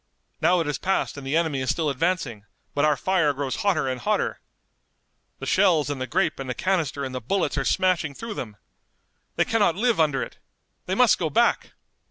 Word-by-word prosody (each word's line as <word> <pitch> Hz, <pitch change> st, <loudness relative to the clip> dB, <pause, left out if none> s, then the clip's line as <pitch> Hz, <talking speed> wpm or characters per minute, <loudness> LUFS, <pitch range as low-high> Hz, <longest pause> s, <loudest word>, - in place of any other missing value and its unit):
Now 175 Hz, +3 st, +4 dB
it -, -, -2 dB
has 150 Hz, -1 st, -2 dB
passed 195 Hz, +1 st, 0 dB
and 140 Hz, -2 st, -8 dB
the 145 Hz, +4 st, +1 dB
enemy 160 Hz, -5 st, 0 dB
is 130 Hz, -, -2 dB
still 160 Hz, -2 st, 0 dB
advancing, 140 Hz, -, -1 dB, 0.3 s
but 145 Hz, -, +1 dB
our 150 Hz, -2 st, +3 dB
fire 170 Hz, -3 st, +2 dB
grows 140 Hz, -1 st, -3 dB
hotter 200 Hz, -10 st, +1 dB
and 130 Hz, -1 st, -3 dB
hotter! 210 Hz, 0 st, 0 dB, 1.0 s
The -, -, -7 dB
shells 155 Hz, -5 st, +3 dB
and 135 Hz, -2 st, -4 dB
the 130 Hz, -, -2 dB
grape 175 Hz, -2 st, 0 dB
and 135 Hz, -1 st, -5 dB
the 125 Hz, -, -2 dB
canister 165 Hz, -6 st, -1 dB
and 130 Hz, -, -6 dB
the 130 Hz, -, -4 dB
bullets 190 Hz, -, 0 dB
are -, -, 0 dB
smashing 180 Hz, -6 st, +1 dB
through 230 Hz, +5 st, -6 dB
them. 110 Hz, -, -7 dB, 0.8 s
They -, -, +2 dB
cannot 220 Hz, -8 st, +2 dB
live 230 Hz, 0 st, +1 dB
under 145 Hz, -4 st, +2 dB
it! -, -, -10 dB, 0.5 s
They -, -, 0 dB
must -, -, +4 dB
go -, -, 0 dB
back!" -, -, +1 dB
155 Hz, 205 wpm, -24 LUFS, 135-185 Hz, 1.0 s, Now